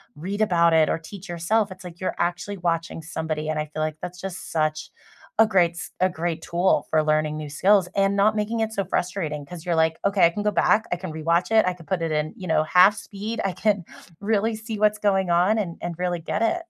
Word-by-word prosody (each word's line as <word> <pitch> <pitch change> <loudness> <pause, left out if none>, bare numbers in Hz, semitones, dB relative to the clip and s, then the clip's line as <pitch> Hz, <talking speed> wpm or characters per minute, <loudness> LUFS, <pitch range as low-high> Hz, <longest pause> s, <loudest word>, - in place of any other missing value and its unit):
read 190 +7 -5
about 170 -5 +4
it 160 -1 +5
or - - +1
teach 195 +4 -11
yourself, 195 +5 0
it's, 185 0 -11
like, 175 -1 -10
you're 185 - -2
actually 175 +4 -2
watching 165 -1 -2
somebody, 155 -2 -3
and 155 -1 -1
I 150 - -1
feel 155 +1 -5
like 155 0 -3
that's 180 0 -7
just 190 -2 -7
such 155 0 -1 0.5
a 225 - +8
great 180 -5 +3
s 180 - -7
a 185 0 +3
great 165 -1 -3
tool 175 +2 +1
for 155 -1 +2
learning 155 0 +1
new 150 -1 -5
skills 190 +5 +3
and 195 0 +2
not 215 +2 +3
making 215 +2 -1
it 220 0 -1
so 195 - -1
frustrating 170 -6 -2
'cause 170 +1 -9
you're, 170 -2 0
like, 160 0 +2
"Okay, 200 -3 +4
I - - +6
can 205 - -4
go 210 - +2
back, 215 +2 +3
I - - +2
can 175 -3 -7
rewatch 170 +5 0
it, 220 -1 +6
I 180 - +1
can 170 -3 -15
put 185 -3 -2
it 165 -1 -1
in, 150 0 -1
you 185 -3 -7
know, 160 -1 +2
half 185 +5 +5
speed, 215 +3 -6
I 195 - +1
can 195 -2 0 0.4
really 220 +1 +1
see 220 -1 -6
what's 210 0 +3
going 195 -3 +1
on 180 +6 +3
and 170 -5 -4
and 175 0 -3
really 180 -1 0
get 200 +6 -3
it." 230 +9 +2
180 Hz, 245 wpm, -24 LUFS, 160-200 Hz, 0.5 s, a